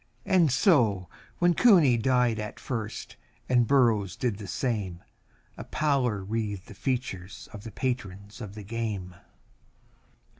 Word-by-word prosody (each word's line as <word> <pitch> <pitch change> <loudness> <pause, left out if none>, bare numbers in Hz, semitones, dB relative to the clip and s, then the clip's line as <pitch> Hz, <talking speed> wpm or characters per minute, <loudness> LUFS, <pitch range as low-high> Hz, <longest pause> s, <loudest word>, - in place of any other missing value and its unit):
And 185 -7 +4
so, 120 - +3 0.3
when 175 0 +4
Cooney 170 - +6
died 120 -1 +2
at 105 -1 -6
first, 110 -4 -5 0.3
and 120 -2 +3
Burrows 110 -9 +3
did 115 -5 -2
the 100 - -7
same, 100 -10 -2 0.5
A - - -6
pallor 130 -9 0
wreathed 105 -1 -3
the - - -11
features 120 -4 -4
of 105 -1 -9
the 115 - -8
patrons 105 -3 -4
of 105 -2 -7
the 105 - -8
game. 105 -4 -4
115 Hz, 135 wpm, -27 LUFS, 100-130 Hz, 0.5 s, Cooney